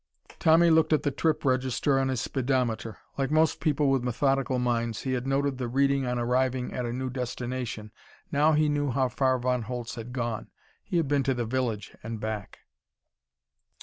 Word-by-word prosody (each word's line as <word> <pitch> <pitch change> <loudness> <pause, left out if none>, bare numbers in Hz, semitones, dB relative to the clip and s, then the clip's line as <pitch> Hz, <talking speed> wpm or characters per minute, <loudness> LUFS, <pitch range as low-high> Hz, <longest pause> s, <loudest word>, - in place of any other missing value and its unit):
Tommy 165 +1 +5
looked 160 0 +4
at 155 - +2
the 145 - +1
trip 155 +2 0
register 130 +1 +2
on 135 - +1
his 130 -2 -1
speedometer. 125 -4 -1 0.2
Like 135 - +1
most 155 +1 +3
people 145 -2 +2
with 135 -2 +1
methodical 135 +1 +1
minds, 115 -2 -1
he 130 - -1
had 125 +1 -2
noted 135 -1 0
the 125 - -2
reading 135 +1 +2
on 125 0 -1
arriving 125 +1 0
at 125 -1 -2
a - - -3
new 130 +1 -3
destination. 125 -3 -4 0.4
Now 150 +3 +4
he 155 0 +3
knew 145 -1 0
how 130 0 +1
far 130 +1 +1
Von 125 0 0
Holtz 120 +1 -5
had 120 0 -7
gone. 120 -3 -3 0.3
He 175 - -2
had 165 -4 +1
been 145 0 +2
to 135 0 0
the 120 -1 -2
village 115 -4 -2
and 110 0 -5
back. 110 -2 -5
130 Hz, 185 wpm, -27 LUFS, 120-140 Hz, 0.4 s, Tommy